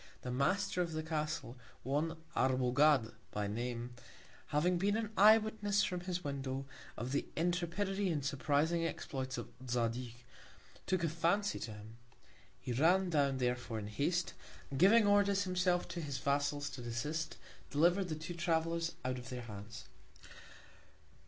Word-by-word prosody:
The 125 - -3
Master 180 +9 +1
of 170 -2 -2
the 155 0 -2
Castle, 155 -5 -3 0.2
one 150 +5 -1 0.2
Arbogad 130 0 +3 0.2
by 105 0 -2
Name, 120 +3 -3 0.5
having 170 +4 +2
been 205 +3 +2
an 220 -2 -3
Eye 215 +3 +8
Witness 210 -2 0
from 185 -3 -1
his 180 0 -3
Window, 135 -2 -3 0.3
of 120 +3 -4
the 140 - 0
Intrepidity 180 +4 0
and 150 -5 -1
surprising 150 +4 +1
Exploits 130 -5 -3
of 120 - -5 0.2
Zadig, 120 0 -1 0.7
took 185 -2 +1
a - - +3
Fancy 170 +6 +1
to 110 - -5
him. 105 +2 -11 0.6
He 125 - -4
ran 175 +8 +3
down 140 -3 +2
therefore 125 -2 -1
in 105 - -4
Haste, 165 +10 0 0.4
and 135 - -3
giving 210 +5 +7
Orders 200 -1 +4
himself 180 -1 +1
to 170 -1 -4
his 140 -4 -3
Vassals 145 0 0
to 125 - -7
desist, 150 +7 -3 0.3
deliver'd 175 +6 +3
the 155 - -1
two 155 +3 -6
Travellers 165 -1 0
out 130 0 -1
of 125 +1 -9
their 125 -1 -5
Hands. 105 -1 -8
155 Hz, 150 wpm, -35 LUFS, 130-180 Hz, 0.7 s, Eye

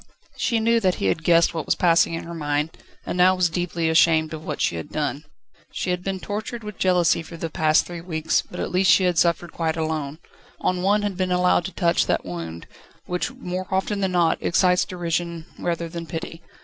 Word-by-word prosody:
She 230 - 0
knew 230 +1 +3
that 185 -4 +1
he - - -3
had 155 +12 0
guessed 170 0 +4
what 160 -3 -4
was - - +2
passing 170 -2 +3
in 165 - -5
her 170 - -8
mind, 150 -1 -2 0.3
and - - -3
now 180 +1 +5
was 180 -2 +1
deeply 170 -1 -1
ashamed 160 -1 +3
of 155 0 -7
what 150 -2 -4
she - - +1
had 80 - -6
done. 150 0 -2 0.5
She 180 - -2
had 180 0 -2
been 195 0 -3
tortured 215 +4 -5
with 210 -2 -8
jealousy 180 -3 +3
for 165 +1 -10
the 165 -1 -4
past 155 0 +3
three 175 -1 -7
weeks, 160 -2 0
but 180 - -10
at - - -3
least 185 +1 +3
she 190 - +6
had 180 -2 +2
suffered 170 0 +1
quite 160 -1 -1
alone: 155 -2 -2 0.5
no - - +3
one 195 +3 +1
had 200 -3 -2
been 185 -1 -1
allowed 180 -1 +3
to 190 - -4
touch 170 -3 +1
that - - 0
wound, 85 -2 -6 0.4
which 180 +4 -2
more 185 -7 -5
often 190 +2 -1
than 190 -2 0
not, 170 -2 +2
excites 180 +1 +3
derision 170 -2 -3
rather 170 -1 -2
than 165 0 -7
pity. 165 0 -6
170 Hz, 215 wpm, -23 LUFS, 160-185 Hz, 0.5 s, she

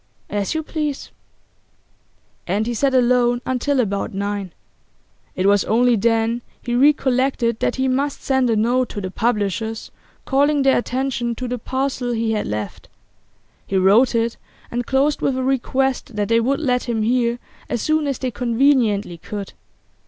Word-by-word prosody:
'As 205 +6 -1
you 315 - -1
please.' 300 -3 -4 1.4
And 200 +5 0
he 240 - -2
sat 270 +3 +1
alone 245 -1 +3
until 260 +2 0
about 200 -4 -1
nine. 200 -2 -3 0.8
It 185 - -1
was 200 0 +4
only 245 +2 +3
then 225 +2 +1 0.2
he 240 - -4
recollected 260 -3 +2
that - - 0
he 265 0 0
must 275 +2 -1
send 265 -2 +2
a 225 - +2
note 240 +3 +1
to 205 - -5
the 185 -1 -5
publishers, 220 0 -2 0.3
calling 285 +1 +2
their 270 0 +4
attention 240 -1 -2
to 250 +2 -4
the 245 0 -3
parcel 260 0 -2
he 225 -1 0
had 215 -1 -1
left. 105 -1 -5 0.8
He 195 - 0
wrote 205 +7 +4
it, 230 0 0 0.3
and 240 0 -3
closed 280 +2 +1
with 265 -1 0
a 260 - -1
request 265 -1 0
that 205 -1 -1
they 230 0 +4
would 265 +4 0
let 250 -5 0
him 230 -3 -1
hear 240 +1 +1 0.3
as 240 - -2
soon 310 -1 +1
as 275 -3 -1
they 255 -1 -3
conveniently 230 -7 +1
could. 200 +2 -7
240 Hz, 160 wpm, -21 LUFS, 220-265 Hz, 1.4 s, was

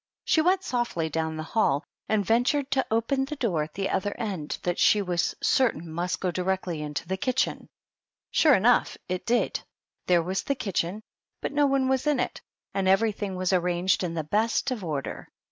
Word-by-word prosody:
She 320 - +4
went 370 +3 +2
softly 235 -10 -1
down 160 0 -1
the 155 - -3
hall, 155 -6 +1 0.3
and 215 -2 +2
ventured 260 - +2
to 265 -1 +2
open 265 +5 +1
a 300 - -3
door 205 - 0
at 150 +1 -6
the 195 0 -1
other 205 +2 -1
end 190 -9 -3
that 175 0 -1
she 210 - +5
was 180 -4 0
certain 240 -10 +2
must 170 +3 -2
go 185 - -1
directly 180 -2 -2
into 150 +2 -4
the 190 +1 -2
kitchen. 255 +6 -1 0.6
Sure 300 -4 +5
enough, 235 +5 +3
it 185 0 -4
did; 240 +1 +1 0.5
there 175 -2 +4
was 185 +3 -1
the 280 - -1
kitchen, 195 -2 -2 0.4
but - - -3
no 290 0 +3
one 270 -1 +2
was 265 +2 +1
in 295 -3 +2
it, - - -2 0.3
and 195 -1 0
everything 200 0 +1
was 185 +1 0
arranged 180 +1 +1
in 170 -2 -2
the 160 - -1
best 225 - +1
of 230 -6 -3
order. 150 -5 -4
195 Hz, 190 wpm, -27 LUFS, 175-245 Hz, 0.6 s, she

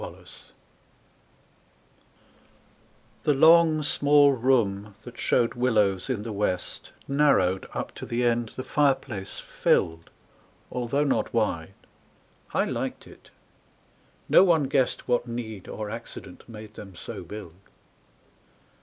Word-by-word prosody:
7 - - -7
Autoplay - - -19 2.9
THE 150 - +2
long 160 +1 +6
small 145 0 +4
room 110 -6 +1
that 120 0 -11
showed 115 - +2
willows 105 -5 +1
in 115 -5 -2
the 115 -1 -5
west 95 -3 -3 0.2
Narrowed 135 -11 +2
up - - -4
to - - -8
the 120 +1 -1
end 120 -1 +1
the 130 - -5
fireplace 130 -8 -1
filled, 80 0 0 0.6
Although 125 +4 0
not 140 - 0
wide. 95 -5 -1 0.8
I - - +1
liked - - -4
it. - - -17 1.0
No - - +7
one 170 -5 +4
guessed 135 -1 0
What 120 0 +1
need 110 -5 -6
or 105 -1 -6
accident 115 +1 -10
made 110 -1 -10
them 100 -4 -11
so - - -7
build. 105 -6 -9
120 Hz, 120 wpm, -26 LUFS, 105-135 Hz, 2.9 s, No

